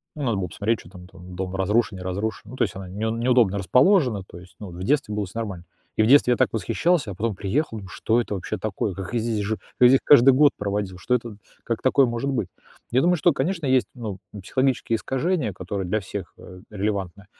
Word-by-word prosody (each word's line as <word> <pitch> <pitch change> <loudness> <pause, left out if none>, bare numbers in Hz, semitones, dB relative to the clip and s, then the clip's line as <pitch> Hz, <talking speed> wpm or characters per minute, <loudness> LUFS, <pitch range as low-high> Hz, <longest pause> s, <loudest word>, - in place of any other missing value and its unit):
ну 150 - -5
надо 115 -6 0
было 95 -2 -2
посмотреть, 105 +6 -1
чё 85 - -14
там 90 -1 -12
там 90 0 -12
дом 95 0 -4
разрушен, 100 +2 +1
не 90 - -8
разрушен, 100 +4 -4
ну - - -8
то - - +1
есть 100 - -3
она 95 -1 -7
не 90 - -10 0.2
неудобно 115 -3 +2
расположена, 125 - +3
то 90 - -13
есть 90 +1 -16
ну 105 - -8
в 85 +1 -9
детстве 120 -2 +1
было 105 -1 -1
всё 95 +5 -7
нормально. 95 -6 -5 0.3
И 110 - +4
в - - +2
детстве 135 -1 +6
я 120 - +2
так - - +3
восхищался, 140 - 0
а - - -7
потом 110 +2 -2
приехал, 110 +4 -2
ну 95 - -10
что 115 +5 +1
это 105 - -4
вообще 95 - -4
такое? 105 -1 -3
Как 95 +4 -7
я 120 - +1
здесь 110 -2 -1
жил 110 +2 -2 0.2
я 125 - +9
здесь 135 +1 +5
каждый 135 -2 +7
год 145 +2 +5
проводил? 100 -2 -3
Что 125 - -2
это, 115 -3 -4 0.3
как 115 -1 -2
такое 130 +1 +4
может 120 +3 -2
быть? 120 -9 -1 0.4
Я 125 +2 +3
думаю, 180 +3 +3
что, 170 +1 +3
конечно, 165 +4 -2
есть, 130 -1 +3
ну, 110 -6 -6
психологические 120 +4 -1
искажения, 135 - -1
которые 95 +1 -4
для 105 +4 0
всех, 95 - -7
а, 90 - -12
релевантны, 100 -2 -3
110 Hz, 235 wpm, -24 LUFS, 95-125 Hz, 0.4 s, я